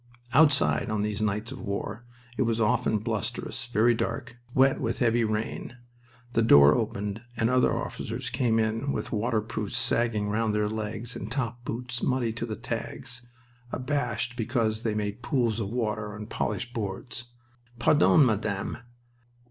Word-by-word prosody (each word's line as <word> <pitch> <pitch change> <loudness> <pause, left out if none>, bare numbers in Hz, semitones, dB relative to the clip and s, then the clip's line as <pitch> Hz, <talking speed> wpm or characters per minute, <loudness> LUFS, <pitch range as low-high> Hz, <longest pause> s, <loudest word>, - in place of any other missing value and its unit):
Outside, 145 -4 +4
on 105 -1 0
these 105 0 -2
nights 110 +2 -1
of - - -7
war, 105 +2 -4 0.3
it - - -1
was 115 -2 +1
often 110 0 +2
blusterous, 120 - -3
very 120 0 +4
dark, 115 0 -3 0.2
wet 135 +1 +4
with - - -1
heavy 120 -1 +3
rain. 110 +2 -3 0.6
The 115 - +3
door 70 -10 +8
opened, 105 +2 -2 0.2
and 115 +1 +2
other 125 0 +4
officers 120 +2 -4
came 120 -3 +2
in 115 +5 0
with - - -3
waterproofs 110 -1 -1
sagging 115 -3 +1
round 110 0 +1
their 105 0 +2
legs 110 +2 -4
and 105 +3 -6
top 120 -2 -2
boots 125 +1 -4
muddy 125 -3 +1
to 115 +1 -4
the 110 - -3
tags, 120 +1 -5 0.4
abashed 125 -3 -1
because 115 -2 0
they 110 -2 -1
made 105 +2 -2
pools 120 -4 +1
of 100 -3 -2
water 105 -3 -2
on 105 0 -6
polished 105 +2 -3
boards. 115 +2 -4 0.5
"Pardon, 145 +4 +5
Madame." 105 -4 -1
115 Hz, 150 wpm, -28 LUFS, 105-120 Hz, 0.6 s, door